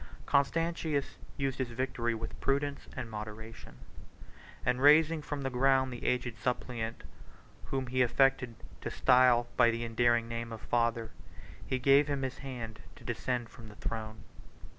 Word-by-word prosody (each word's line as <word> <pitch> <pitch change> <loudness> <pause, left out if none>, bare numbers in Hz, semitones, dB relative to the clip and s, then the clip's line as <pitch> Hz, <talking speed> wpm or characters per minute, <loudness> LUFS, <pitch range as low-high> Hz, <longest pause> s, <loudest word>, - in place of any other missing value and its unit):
Constantius 155 0 0 0.2
used 135 -1 -2
his 130 - 0
victory 120 -1 -1
with 115 0 -7
prudence 140 +1 -1
and 130 -3 -4
moderation; 110 +1 -8 0.9
and 125 +1 +1
raising 155 +2 +6
from 145 -1 -4
the 135 - -2
ground 130 0 +3
the 120 - -8
aged 125 -2 -1
suppliant, 120 -2 -3 0.6
whom 135 -1 -2
he 130 +1 0
affected 125 -1 +3 0.3
to - - -3
style 125 -1 +5
by 120 -2 +6
the 115 0 -2
endearing 115 0 +2
name 115 0 -4
of 115 - -6
Father, 115 -1 0 0.6
he 130 - 0
gave 140 +3 +5
him 140 -2 -1
his 130 0 -4
hand 120 -5 -7
to - - -15
descend 125 -2 -2
from 115 -1 -13
the 105 - -13
throne. 110 0 -5
125 Hz, 150 wpm, -31 LUFS, 115-135 Hz, 0.9 s, raising